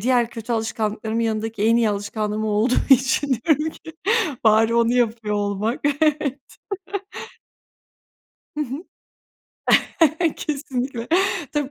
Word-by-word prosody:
diğer 240 Hz, +1 st, +2 dB
kötü 230 Hz, 0 st, -5 dB
alışkanlıklarımın 220 Hz, 0 st, -2 dB
yanındaki 220 Hz, -1 st, -2 dB
en 230 Hz, +1 st, +4 dB
iyi 235 Hz, -2 st, +3 dB
alışkanlığım 210 Hz, +1 st, -2 dB
o -, -, -1 dB
olduğu 215 Hz, +4 st, +2 dB, 0.2 s
için 265 Hz, +2 st, +4 dB, 0.2 s
diyorum 310 Hz, 0 st, +2 dB
ki: 320 Hz, -, -12 dB, 0.5 s
"Bari 220 Hz, +1 st, +4 dB
onu 235 Hz, 0 st, +3 dB
yapıyor 225 Hz, -3 st, 0 dB
olmak" 205 Hz, +3 st, -1 dB, 0.2 s
Evet. 295 Hz, -3 st, +1 dB, 2.2 s
Hı -, -, +1 dB
hı. 275 Hz, +5 st, -6 dB, 1.5 s
Kesinlikle. 265 Hz, -5 st, -3 dB, 0.4 s
Tabii, 290 Hz, -2 st, -1 dB
230 Hz, 110 wpm, -22 LUFS, 215-265 Hz, 2.2 s, en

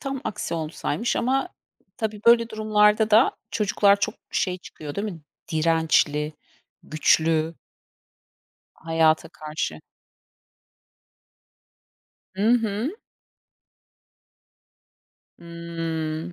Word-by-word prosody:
tam 270 Hz, -2 st, -4 dB
aksi 190 Hz, -, -3 dB
olsaymış 165 Hz, +8 st, -2 dB
ama 270 Hz, +6 st, +1 dB, 0.5 s
tabii 215 Hz, -2 st, -3 dB
böyle 235 Hz, -1 st, +6 dB
durumlarda 215 Hz, 0 st, +3 dB
da 220 Hz, +5 st, +5 dB, 0.2 s
çocuklar 205 Hz, -1 st, +3 dB
çok 215 Hz, -, 0 dB, 0.2 s
şey 185 Hz, -1 st, -1 dB
çıkıyor 150 Hz, -4 st, -9 dB
değil 200 Hz, -, -2 dB
mi? 165 Hz, -, -11 dB, 0.3 s
Dirençli, 155 Hz, -2 st, +2 dB, 0.5 s
güçlü. 160 Hz, +1 st, +2 dB, 1.2 s
Hayata 160 Hz, -1 st, +1 dB
karşı. 150 Hz, -, -5 dB, 2.5 s
Hı 200 Hz, +3 st, 0 dB
hı. 230 Hz, -, 0 dB, 2.4 s
Hıı. 165 Hz, -1 st, -5 dB
175 Hz, 75 wpm, -24 LUFS, 160-215 Hz, 2.5 s, böyle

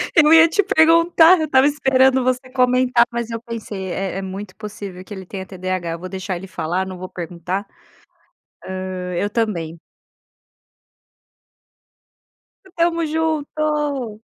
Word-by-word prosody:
Eu 305 Hz, -2 st, +6 dB
ia 325 Hz, 0 st, +8 dB
te 410 Hz, -, +2 dB
perguntar, 335 Hz, -1 st, +5 dB
eu 315 Hz, -, 0 dB
estava 265 Hz, -3 st, +4 dB
esperando 265 Hz, -2 st, +3 dB
você 255 Hz, 0 st, -1 dB
comentar, 250 Hz, -1 st, +3 dB
mas 235 Hz, -1 st, -3 dB
eu 230 Hz, -, -4 dB
pensei 215 Hz, -5 st, -6 dB
é 195 Hz, +1 st, -3 dB
é -, -, -3 dB
muito 190 Hz, +1 st, -7 dB
possível 200 Hz, -4 st, -8 dB
que 205 Hz, -, -10 dB
ele 190 Hz, -1 st, -8 dB
tenha 190 Hz, +1 st, -7 dB
TDAH. 185 Hz, -2 st, -4 dB
Eu 165 Hz, -, -5 dB
vou 185 Hz, -, -7 dB
deixar 190 Hz, 0 st, -4 dB
ele 190 Hz, +3 st, -8 dB
falar, 185 Hz, +1 st, -2 dB
não 185 Hz, -1 st, -7 dB
vou 185 Hz, +1 st, -7 dB
perguntar. 175 Hz, +3 st, -5 dB, 1.0 s
Hã, 185 Hz, -1 st, -5 dB
eu 205 Hz, +4 st, -1 dB
também. 185 Hz, -8 st, -2 dB, 2.9 s
Estamos 335 Hz, -3 st, 0 dB
junto! 300 Hz, -6 st, -2 dB
220 Hz, 140 wpm, -20 LUFS, 185-295 Hz, 2.9 s, ia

